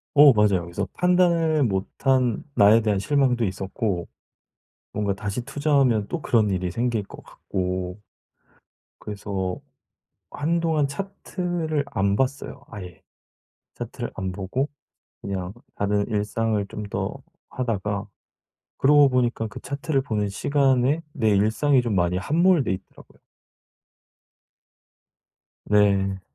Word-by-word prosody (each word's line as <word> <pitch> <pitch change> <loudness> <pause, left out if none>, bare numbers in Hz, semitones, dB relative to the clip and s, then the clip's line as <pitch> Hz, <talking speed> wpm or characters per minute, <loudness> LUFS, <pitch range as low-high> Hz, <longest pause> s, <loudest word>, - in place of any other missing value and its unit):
어 145 -2 +9
맞아요. 100 -5 +3
그래서 90 +3 -4
판단을 170 -4 +3
못한 120 +4 0
나에 110 +1 +6
대한 105 -2 +1
실망도 125 0 +2
있었고 95 -1 -3 0.9
뭔가 100 -1 0
다시 105 +4 -4
투자하면 140 -6 +2
또 170 - -4
그런 110 -3 +3
일이 90 -1 -1
생길 115 0 -1
것 - - -12
같고 90 0 -4 1.0
그래서 100 -3 -4 0.7
한동안 160 -1 0
차트를 175 -4 -3
안 100 -6 0
봤어요 140 +1 -2
아예. 90 -5 -9 0.7
차트를 - - -6
안 95 -1 -3
보고 105 +9 -2 0.5
그냥 95 -2 -4 0.2
다른 100 0 0
일상을 105 0 -1
좀 105 - -6
더 100 - -3 0.3
하다가 105 -5 -2 0.7
그러고 145 0 +6
보니까 120 -3 0
그 105 - -9
차트를 140 0 -1
보는 105 -5 -1
시간에 135 +5 +2
내 110 -5 +1
일상이 110 +7 +3
좀 115 -3 -2
많이 90 0 +1
함몰돼 160 - +2
있더라고요. 95 0 -9 2.5
네. 100 -2 +2
110 Hz, 235 characters per minute, -24 LUFS, 100-140 Hz, 2.5 s, 어